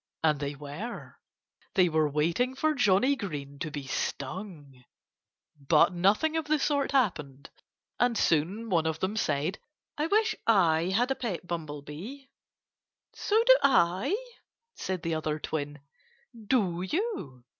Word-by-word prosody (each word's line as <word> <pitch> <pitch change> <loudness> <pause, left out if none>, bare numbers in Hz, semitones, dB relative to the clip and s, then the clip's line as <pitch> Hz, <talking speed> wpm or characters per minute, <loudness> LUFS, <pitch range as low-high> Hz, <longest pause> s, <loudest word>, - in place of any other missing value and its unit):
And 155 -3 +3
they 145 0 -3
were. 150 - -8 0.6
They 185 -3 +5
were 155 -2 +2
waiting 170 - 0
for 310 +3 +1
Johnnie 250 +1 +3
Green 145 - -6
to 155 - -3
be 145 -2 -6
stung. 140 -1 -5 0.7
But 150 +5 +3
nothing 205 - +2
of 320 -1 -1
the 305 +1 +2
sort 285 -1 0
happened. 150 - -1 0.5
And 245 -2 +2
soon 190 +9 +1
one 165 -3 +2
of 160 0 -2
them 190 +3 -1
said: 155 -1 -1 0.4
"I 305 - +1
wish 435 +3 +2
I 170 -7 +4
had 230 +8 +1
a - - +1
pet 205 -10 -4
bumblebee." 165 - -6 0.9
"So 440 +2 +1
do - - +8
I!" 190 - +3 0.6
said 185 -2 -4
the 165 - -1
other 155 -1 -1
twin. 145 -2 -4 0.7
"Do 190 -9 +1
you?" 190 - -3
180 Hz, 135 wpm, -28 LUFS, 150-245 Hz, 0.9 s, do